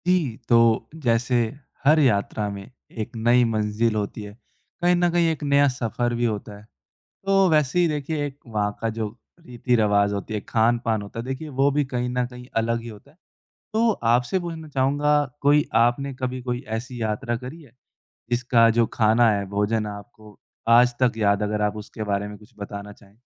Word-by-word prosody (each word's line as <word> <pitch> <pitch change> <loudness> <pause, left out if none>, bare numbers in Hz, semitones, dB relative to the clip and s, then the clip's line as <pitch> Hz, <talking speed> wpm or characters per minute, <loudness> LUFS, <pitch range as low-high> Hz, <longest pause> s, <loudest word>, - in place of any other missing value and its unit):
जी, 165 -11 +1
तो 115 -2 +4
जैसे 125 -4 0 0.5
हर 155 +3 +6
यात्रा 105 -5 +1
में 100 +2 -8 0.3
एक 110 - -5
नई 120 +2 +3
मंजिल 110 0 0
होती 105 +1 -3
है, 105 0 -9 0.5
कहीं 175 0 +4
न 175 0 +2
कहीं 170 -1 +2
एक 155 -2 -5
नया 140 0 +4
सफ़र 120 -1 -2
भी 120 +1 0
होता 105 -2 -3
है। 105 - -15 0.6
तो 195 -1 +4
वैसे 150 0 +2
ही 175 - +3
देखिए 150 0 -2
एक 140 0 -9
वहाँ 105 -3 -1
का 115 - -1
जो 110 -1 -1 0.4
रीति-रिवाज़ 105 -5 +1
होती 100 +2 -5
है, 105 - -1
खान-पान 115 0 +1
होता 100 +3 -7
है, - - -6
देखिए 135 +4 -5
वो 135 0 +2
भी 145 +1 +1
कहीं 125 -2 -3
न 125 0 0
कहीं 125 0 -11
अलग 115 +1 +1
ही 120 - -8
होता 110 +5 -13
है। 150 - -27 0.6
तो 225 +1 +3 0.2
आपसे 125 +10 +1
पूछना 165 -2 -7
चाहूँगा, 145 +2 +2 0.2
कोई 145 +1 +4 0.2
आपने 135 +3 0
कभी 130 0 -4
कोई 125 0 -3
ऐसी 115 +3 -5
यात्रा 110 +2 -2
करी 130 +7 -9
है, 135 -7 -19 0.6
जिसका 120 -1 +3
जो 115 - +4
खाना 115 +1 +4
है, 100 -1 0
भोजन 105 +2 0
है, 105 - -5
आपको 105 0 -13 0.3
आज 120 +1 +6
तक 125 -2 +4
याद 100 -1 +2
है 105 - 0
अगर 105 0 -1
आप 105 0 0
उसके 105 +1 -8
बारे 100 0 -1
में 105 - -9
कुछ 105 +2 -20
बताना 100 0 -7
चाहें? 100 0 -21
120 Hz, 195 wpm, -23 LUFS, 105-140 Hz, 0.6 s, हर